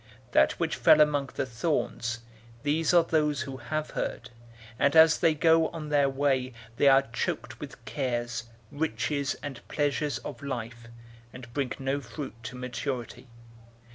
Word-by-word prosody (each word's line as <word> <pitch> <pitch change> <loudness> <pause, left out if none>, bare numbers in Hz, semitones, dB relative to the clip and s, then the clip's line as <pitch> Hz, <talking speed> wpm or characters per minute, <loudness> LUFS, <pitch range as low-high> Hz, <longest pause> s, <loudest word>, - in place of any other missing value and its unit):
008:014 - - -28
That - - +5
which - - -2
fell 155 - +6
among 145 -2 +3
the 140 - -1
thorns, 120 -3 -2 0.4
these 150 +2 +1
are 175 -1 +6
those 150 -4 +1
who 135 0 -5
have 155 +4 -3
heard, - - -4 0.5
and 140 +1 +3
as 160 0 +7
they 165 -2 +3
go 160 +1 +4
on 155 -2 -7
their 145 -2 +3
way 135 -2 0 0.2
they 145 - +4
are 135 0 +7
choked - - -3
with - - -10
cares, 120 -3 -2 0.3
riches, 145 -1 -1
and 135 -4 -6
pleasures 145 0 0
of 140 -5 -8
life, 120 -4 -5 0.4
and 120 -2 -11
bring 135 -2 -1
no 135 +1 -1
fruit 135 +3 -7
to 125 - -7
maturity. 125 0 -5
140 Hz, 155 wpm, -28 LUFS, 125-150 Hz, 0.5 s, as